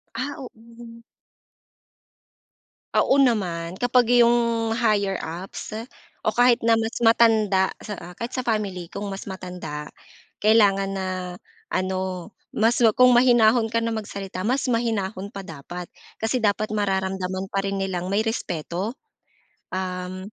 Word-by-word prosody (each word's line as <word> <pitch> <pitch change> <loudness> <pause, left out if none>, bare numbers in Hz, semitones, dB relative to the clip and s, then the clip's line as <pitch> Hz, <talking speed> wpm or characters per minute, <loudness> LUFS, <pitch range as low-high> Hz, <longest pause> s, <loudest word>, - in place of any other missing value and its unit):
Ah, 260 +4 -3
oo. 255 - -8 2.4
Oo 280 - +4
naman. 180 -9 +1
Kapag 245 +1 +3
'yong 235 -2 +3
higher 210 -4 +1
ups 180 +6 -6 0.5
o 215 - +2
kahit 245 +1 +4
na 230 - +4
mas 225 +1 -3
matanda 220 -4 +4 0.2
sa 180 -4 -8
kahit 235 +2 -5
sa 255 - -2
family 200 -6 -1
kung 205 - -6
mas 195 +1 -7
matanda, 180 -6 -7 0.5
kailangan 205 -2 +4
na 190 -1 -2 0.6
ano 185 0 -2 0.2
mas 230 +3 +1
ma 225 -3 +4
kung 250 0 +7
mahinahon 240 -2 +5
ka 230 +1 0
na 230 - -1
magsalita, 200 -4 -5
mas 245 +8 0
mahinahon 215 -4 -1
pa 200 -2 -8
dapat. 175 +2 -8 0.3
Kasi 225 +3 -1
dapat 215 0 0
mararamdaman 190 -2 -2
pa 195 - +1
rin 195 0 -2
nilang 185 -2 -2
may 200 +3 +1
respeto. 190 - -3 0.7
Um, 185 0 -4
205 Hz, 125 wpm, -24 LUFS, 185-230 Hz, 2.4 s, kung